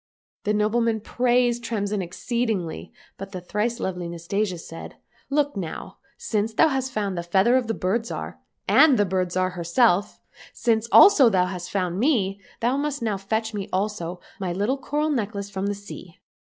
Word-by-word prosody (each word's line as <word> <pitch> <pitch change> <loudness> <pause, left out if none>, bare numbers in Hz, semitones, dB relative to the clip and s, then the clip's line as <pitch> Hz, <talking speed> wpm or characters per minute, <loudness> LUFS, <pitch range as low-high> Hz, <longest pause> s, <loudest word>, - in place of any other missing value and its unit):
The 210 - +2
noble 210 +3 +2
man 230 -1 +1
praised 245 +1 +1
Tremsin 205 -3 -2
exceedingly, 185 - -3 0.3
but 195 +1 -8
the 185 - -4
thrice 210 +6 -2
lovely 180 -2 -3
Nastasia 180 +3 -2
said, 165 0 -9 0.2
" - - -35
Look 290 -3 0
now! 180 -5 -6 0.2
since 220 0 -2
thou 320 - +5
hast 265 -2 -2
found 205 -5 -2
the 170 - -2
feather 190 +8 +3
of 255 -3 +1
the 225 - -1
Bird 225 +6 -1
Zhar, 80 - -6 0.3
and 280 -1 +6
the 205 - +3
Bird 185 -1 -1
Zhar 185 0 0
herself, 180 +3 +1 0.3
since 225 -2 +1
also 315 - +8
thou 185 -4 +2
hast 180 -1 -5
found 180 -2 -1
me, 205 -7 +1 0.2
thou 245 +4 +1
must 285 -3 -2
now 215 -3 0
fetch 220 +3 -2
me 205 0 -4
also 185 -3 -2 0.2
my 185 -2 -2
little 205 +10 -1
coral 300 +3 -1
necklace 205 -6 -3
from 195 0 -2
the 205 - -1
sea 200 -4 -11
205 Hz, 180 wpm, -24 LUFS, 185-235 Hz, 0.3 s, also